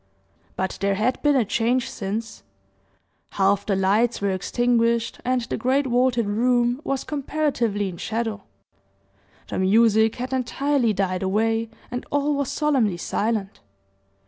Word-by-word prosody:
But 190 0 -3
there 200 0 +1
had 225 +6 0
been 295 -1 +3
a 250 -4 +3
change 235 +4 +1
since 215 +2 -5 0.9
half 200 +1 +1
the 200 - +1
lights 205 +5 +2
were 200 -1 0
extinguished, 235 +3 0
and 255 0 +1
the 235 - -4
great 260 +5 +1
vaulted 245 -2 +2
room 240 +4 +1
was 275 -5 -2
comparatively 275 -8 -1
in 180 -2 -7
shadow 225 +1 -3 1.1
the - - -3
music 220 +3 +4
had 250 +2 -5
entirely 260 -1 +1
died 190 -2 -1
away 225 +4 0 0.2
and 245 0 -4
all 290 +1 +1
was 280 -2 -1
solemnly 260 - +1
silent. 210 +2 -2
230 Hz, 135 wpm, -23 LUFS, 205-255 Hz, 1.1 s, music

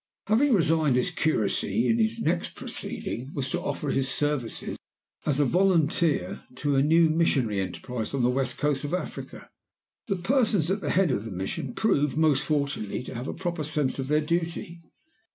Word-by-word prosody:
"Having 245 +6 +3
resigned 160 -6 +3
his 125 - +1
curacy, 115 - +1
his 225 0 +1
next 170 +2 0
proceeding 130 +4 -5
was 130 -2 -2
to - - -1
offer 145 - -2
his 135 0 0
services, 145 -3 -2 0.5
as 145 -3 +2
volunteer, 165 - +2
to 145 +2 0
a 135 - +4
new 160 +3 +5
missionary 140 -10 +1
enterprise 110 +4 -4
on 130 - 0
the 120 - +4
West 130 -1 -1
Coast 145 -2 0
of 145 +4 -1
Africa. 185 - -7 0.6
The 195 - 0
persons 205 - +2
at 200 +1 -1
the 145 - -2
head 180 -3 +3
of 100 -5 -1
the 110 - -7
mission 95 +7 -4
proved, 150 -10 +1
most 155 -4 +3
fortunately, 140 -8 -1
to - - -8
have 125 +2 -5
a - - -3
proper 170 -2 -3
sense 150 -3 -1
of 130 - -2
their 150 +2 +3
duty. 170 +1 -2
150 Hz, 170 wpm, -27 LUFS, 130-170 Hz, 0.6 s, new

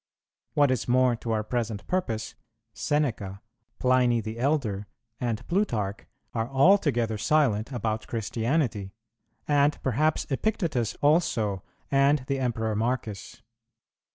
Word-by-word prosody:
What 145 -2 +4
is 130 - -1
more 125 0 +4
to 115 - -7
our 110 -1 0
present 115 -2 -3
purpose, 115 -13 -2 0.4
Seneca, 115 -11 -1 0.4
Pliny 125 -2 +3
the 110 +1 -5
elder, 120 -8 0 0.3
and 120 0 -2
Plutarch 115 - -1 0.3
are 115 0 -2
altogether 135 - +3
silent 130 -5 +2
about 110 -3 -2
Christianity; 115 -2 -1 0.5
and 145 0 +3
perhaps 145 +5 +1
Epictetus 150 - 0
also, 115 - +2 0.3
and 140 0 +4
the 135 0 -1
Emperor 110 -4 -1
Marcus. 110 -2 -3
120 Hz, 110 wpm, -27 LUFS, 110-145 Hz, 0.5 s, What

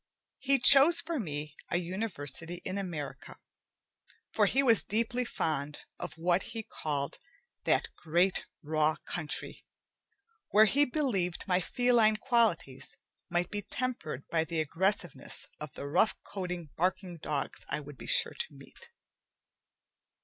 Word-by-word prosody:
He 275 0 +4
chose 275 +6 +8
for 330 -2 -2
me 150 - -4
a - - +1
university 175 -4 -2
in 185 +2 -2
America, 160 -8 -6 0.9
for - - +3
he 275 - +2
was 230 -5 +6
deeply 235 +3 0
fond 150 - -2 0.2
of 175 - -6
what 175 +2 +2 0.2
he 225 - -3
called 145 -7 -4 0.5
"that - - +2
great 175 +3 +1 0.2
raw 155 0 +1
country," 160 -4 -3 0.9
where 215 +1 +6
he 280 +7 +3
believed 220 - -1
my 180 -1 +2
feline 235 -1 +3
qualities 215 - 0 0.3
might 175 0 -1
be 205 0 -3
tempered 220 - -4
by 160 -1 +1
the 165 0 -3
aggressiveness 165 -2 0
of 150 -2 -7
the - - -7
rough 150 +9 +2
coated 180 -5 -6
barking 185 0 -1
dogs 150 -2 -3
I 150 - -1
would 145 -2 -11
be - - -9
sure - - +4
to 475 0 -5
meet. 475 - -14
180 Hz, 135 wpm, -31 LUFS, 155-225 Hz, 0.9 s, chose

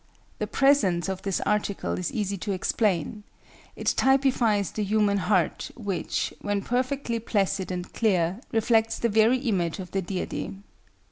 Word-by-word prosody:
The - - -1
presence 225 -12 +3
of 190 -1 -3
this 195 -2 -1
article 205 -1 -1
is 180 - -2
easy 200 -2 -2
to 205 - -3
explain: 195 +1 0 0.5
it - - -8
typifies 255 -7 +2
the 215 - -2
human 205 0 +2
heart, 180 -2 0
which, 200 -7 -2
when 205 -1 -1
perfectly 250 -1 -1
placid 195 -4 0
and 180 0 -5
clear, 190 -2 +1
reflects 225 0 +2
the 235 - 0
very 220 +4 +4
image 195 -10 -1
of 185 -2 -8
the 195 - 0
Deity. 185 +1 -4
205 Hz, 145 wpm, -26 LUFS, 190-230 Hz, 0.5 s, very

